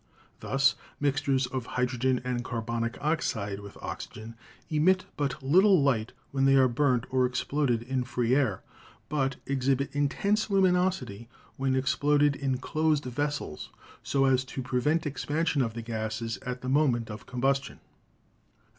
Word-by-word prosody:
Thus, 135 Hz, -1 st, +2 dB, 0.3 s
mixtures 140 Hz, -2 st, +1 dB
of 125 Hz, -1 st, -4 dB
hydrogen 125 Hz, 0 st, +1 dB
and 125 Hz, -1 st, -2 dB
carbonic 115 Hz, -1 st, -3 dB
oxide 110 Hz, -10 st, -1 dB
with 100 Hz, -1 st, -11 dB
oxygen 110 Hz, +1 st, -7 dB, 0.3 s
emit 180 Hz, +5 st, +2 dB
but 140 Hz, -1 st, -2 dB
little 185 Hz, +7 st, +5 dB
light 115 Hz, -5 st, +1 dB, 0.2 s
when 135 Hz, -1 st, +1 dB
they 135 Hz, 0 st, +5 dB
are 130 Hz, -1 st, +6 dB
burnt 125 Hz, -1 st, +1 dB
or 130 Hz, -1 st, +3 dB
exploded 125 Hz, -2 st, 0 dB
in 130 Hz, +1 st, -1 dB
free 120 Hz, -1 st, 0 dB
air, 130 Hz, -9 st, +1 dB, 0.5 s
but 135 Hz, -3 st, 0 dB
exhibit 135 Hz, +1 st, 0 dB
intense 200 Hz, +10 st, +1 dB
luminosity 180 Hz, -, +1 dB, 0.3 s
when 135 Hz, -1 st, 0 dB
exploded 145 Hz, +2 st, +2 dB
in 135 Hz, -2 st, -1 dB
closed 155 Hz, +2 st, 0 dB
vessels 145 Hz, -, -3 dB, 0.3 s
so 135 Hz, -1 st, +1 dB
as 130 Hz, -1 st, +3 dB
to 130 Hz, 0 st, -5 dB
pre 125 Hz, 0 st, -1 dB
vent 160 Hz, +5 st, +1 dB
expansion 150 Hz, +1 st, 0 dB
of 115 Hz, -3 st, -2 dB
the 115 Hz, -, -5 dB
gases 110 Hz, 0 st, -3 dB
at 125 Hz, -1 st, -4 dB
the 130 Hz, -, -4 dB
moment 130 Hz, -6 st, +2 dB
of 105 Hz, 0 st, -9 dB
combustion. 135 Hz, +2 st, -1 dB
135 Hz, 145 wpm, -28 LUFS, 120-145 Hz, 0.5 s, are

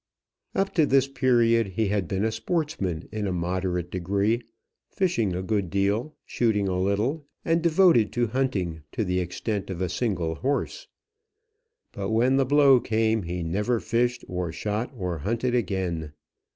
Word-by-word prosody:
Up 195 Hz, 0 st, 0 dB
to 160 Hz, -4 st, +3 dB
this 135 Hz, 0 st, +4 dB
period 120 Hz, -4 st, +3 dB
he 100 Hz, +2 st, -1 dB
had 100 Hz, -3 st, 0 dB
been 95 Hz, +4 st, -1 dB
a 110 Hz, -, +1 dB
sportsman 110 Hz, -, -2 dB
in 105 Hz, -1 st, -2 dB
a -, -, -1 dB
moderate 90 Hz, 0 st, -2 dB
degree, 100 Hz, +6 st, 0 dB, 0.5 s
fishing 115 Hz, -, 0 dB
a 90 Hz, -, -3 dB
good 100 Hz, -2 st, -1 dB
deal, 100 Hz, -, 0 dB
shooting 105 Hz, -4 st, +1 dB
a 90 Hz, -1 st, -1 dB
little, 110 Hz, -, 0 dB, 0.2 s
and 165 Hz, 0 st, +2 dB
devoted 165 Hz, -, +4 dB
to 120 Hz, 0 st, +1 dB
hunting, 105 Hz, -10 st, -1 dB
to 110 Hz, -4 st, -1 dB
the 90 Hz, 0 st, 0 dB
extent 100 Hz, +4 st, -3 dB
of 95 Hz, -3 st, -4 dB
a 90 Hz, -1 st, -1 dB
single 90 Hz, -5 st, -1 dB
horse. 140 Hz, -, -2 dB, 1.0 s
But 100 Hz, 0 st, -4 dB
when 120 Hz, +4 st, +3 dB
the 135 Hz, -, +3 dB
blow 140 Hz, -2 st, +6 dB
came, 110 Hz, -1 st, +1 dB
he 90 Hz, -1 st, -4 dB
never 105 Hz, +8 st, 0 dB
fished 120 Hz, +2 st, 0 dB
or 90 Hz, -2 st, -3 dB
shot, 105 Hz, +7 st, -3 dB
or 90 Hz, -5 st, -3 dB
hunted 115 Hz, -, -1 dB
again. 90 Hz, -9 st, -1 dB
105 Hz, 160 wpm, -26 LUFS, 90-125 Hz, 1.0 s, blow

